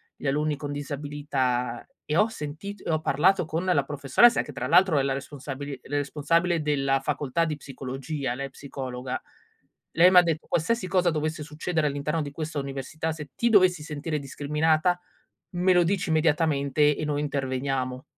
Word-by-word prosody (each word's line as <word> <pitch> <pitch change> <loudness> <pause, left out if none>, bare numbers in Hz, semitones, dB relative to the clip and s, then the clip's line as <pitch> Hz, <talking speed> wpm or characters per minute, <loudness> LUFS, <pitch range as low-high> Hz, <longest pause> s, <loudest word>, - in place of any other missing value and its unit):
gli - - -6
alunni 150 +1 0
con 145 0 -5
disabilità, 145 -4 -2 0.2
e 155 +2 0
ho 210 - +5
sentito 200 +1 -7
e - - -1
ho 155 -1 +1
parlato 180 +6 +3
con 160 +3 -3
la 175 -7 +3
professoressa 145 - +4
che - - -9
tra 130 -1 -3
l'altro, 170 -1 +5
è - - +1
la 135 - 0
responsabili 140 0 -6
la 145 - -2
responsabile 165 +4 +1
della 135 -2 +1
facoltà 145 +3 -1
di 155 -2 -3
psicologia, 135 -1 -5
lei 135 - -4
è - - -15
psicologa, 130 -2 -5 0.7
lei 175 +3 +6
m'ha 180 -1 +8
detto: 165 -2 -2
"Qualsiasi 185 +5 0
cosa 180 -1 +3
dovesse 155 0 -2
succedere 155 +1 -2
all'interno 145 +3 -2
di 145 - -5
questa 155 +1 -5
università, 140 +4 -3
se 150 -3 -8
ti 235 - +1
dovessi 185 -6 +5
sentire 150 0 -3
discriminata, 155 +5 +1 0.6
me 180 +2 +3
lo 175 -1 +5
dici 185 0 0
immediatamente 150 -2 +2
e - - -4
noi 145 -1 -1
interveniamo." 130 -2 -2
150 Hz, 170 wpm, -26 LUFS, 140-165 Hz, 0.7 s, m'ha